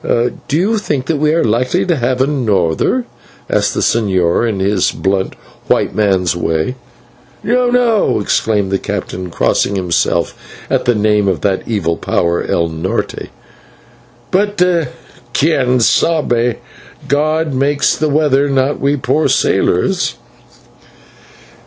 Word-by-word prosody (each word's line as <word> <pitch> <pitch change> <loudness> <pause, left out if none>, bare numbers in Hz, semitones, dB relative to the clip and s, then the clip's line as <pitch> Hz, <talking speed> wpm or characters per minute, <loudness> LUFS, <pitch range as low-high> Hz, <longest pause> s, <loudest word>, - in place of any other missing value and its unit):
"Do 120 +4 -1
you 210 +6 +1
think 145 -10 -2
that 160 0 -1
we 150 +1 +2
are 165 - +2
likely 125 +10 +1
to 175 - +1
have 130 -1 0
a - - +4
norther?" 115 - 0 0.4
asked - - 0
the - - -1
señor 100 -1 +1
in 100 -3 -3
his 95 0 +1
blunt 95 0 -1 0.3
white - - +1
man's 95 -5 +1
way. 80 +4 -1 0.7
"No, 245 +2 +2
no," 240 - +2
exclaimed 105 -1 0
the 95 - +1
captain, 95 -2 -5
crossing 100 +3 0
himself 90 -3 0 0.4
at - - +1
the 120 - +2
name 105 -1 +2
of 95 -4 0
that 95 -2 0
evil 90 -7 -1
power 85 0 0
/el 85 -1 -1
Norte/, 80 +4 -3 1.0
"but 205 +2 +1 0.8
/quien 135 -5 +2
sabe!/ 120 -3 +2 0.5
God 155 +2 0
makes 140 +2 +1
the 155 - -1
weather, 145 -1 +2
not 135 +1 0
we 140 +1 +1
poor 140 +4 +1
sailors." - - +1
120 Hz, 130 wpm, -15 LUFS, 95-150 Hz, 1.0 s, a